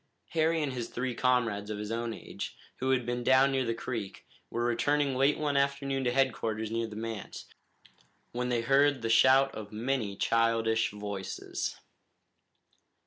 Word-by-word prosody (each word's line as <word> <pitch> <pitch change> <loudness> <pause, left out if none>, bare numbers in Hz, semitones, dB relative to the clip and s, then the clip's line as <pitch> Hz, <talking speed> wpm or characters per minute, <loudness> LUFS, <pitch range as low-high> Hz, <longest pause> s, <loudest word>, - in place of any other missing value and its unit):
Harry 160 0 +1
and 135 -3 -2
his 120 -2 -4
three 125 0 -2
comrades 115 -5 +1
of 105 - -3
his 105 +1 -5
own 115 0 -2
age, - - -7 0.2
who 130 - -1
had 130 -2 +2
been 120 0 -2
down 130 +2 +5
near 135 -1 +1
the 115 - 0
creek, 115 -5 -5 0.2
were 120 0 -1
returning 140 +4 +1
late 135 +3 +3
one 150 -2 -1
afternoon 140 -1 0
to 120 - +1
headquarters 115 -4 0
near 115 0 -1
the 110 - -9
manse, 110 -2 -6 0.9
when 125 +1 -2
they 120 -2 +1
heard 135 +1 +3
the 115 - -1
shout 130 +4 +5
of 105 -2 -8
many 110 -2 -2
childish 115 0 +2
voices. 100 -2 -5
120 Hz, 160 wpm, -30 LUFS, 115-135 Hz, 0.9 s, down